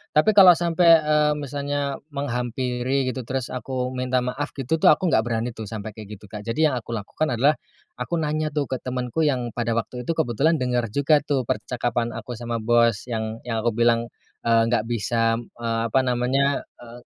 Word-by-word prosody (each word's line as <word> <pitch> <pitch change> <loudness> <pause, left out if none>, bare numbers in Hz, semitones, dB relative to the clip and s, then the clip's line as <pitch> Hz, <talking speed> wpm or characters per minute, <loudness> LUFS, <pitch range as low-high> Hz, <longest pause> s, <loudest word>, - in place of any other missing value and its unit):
Tapi 155 +8 +5
kalau 185 -3 +10
sampai, 170 -1 +4
eee, 150 0 +3
misalnya 145 0 -3
menghampiri 125 0 -1
gitu, 125 -1 -6
terus 130 -1 -3
aku 125 0 -3
minta 130 0 -1
maaf 130 +4 -4
gitu 140 +4 -1
tuh, - - +4
aku 165 +2 +4
nggak - - +4
berani 115 +1 -1
tuh, 110 -1 -8
sampai 110 +1 -6
kayak 105 0 -9
gitu, 105 +1 -15
Kak. 105 0 -7
Jadi 135 +8 0
yang 130 - -2
aku 115 +1 -6
lakukan 115 +9 -2
adalah, 140 +6 +3 0.4
aku 125 +7 -2
nanya 155 0 -1
tuh 145 -2 -1
ke 130 - -1
temanku 125 +5 -2
yang 125 -4 -1
pada 115 0 -2
waktu 125 +1 -4
itu, - - +2
kebetulan 155 +2 +2
denger 125 -2 0
juga 145 +2 +4
tuh, 135 -3 0
percakapan 120 0 -2
aku 115 +1 -7
sama 120 -1 -3
bos, 115 -2 +3
yang 110 0 -3
yang 115 -2 -2
aku 115 -2 +1
bilang, 115 0 +2 0.4
eee, 115 -1 +5
nggak 120 -3 +2
bisa, 115 0 +1
eee, 115 0 -4
apa 135 - +4
namanya, 130 +3 +1 0.2
eee, 120 0 -12
125 Hz, 190 wpm, -23 LUFS, 115-140 Hz, 0.4 s, kalau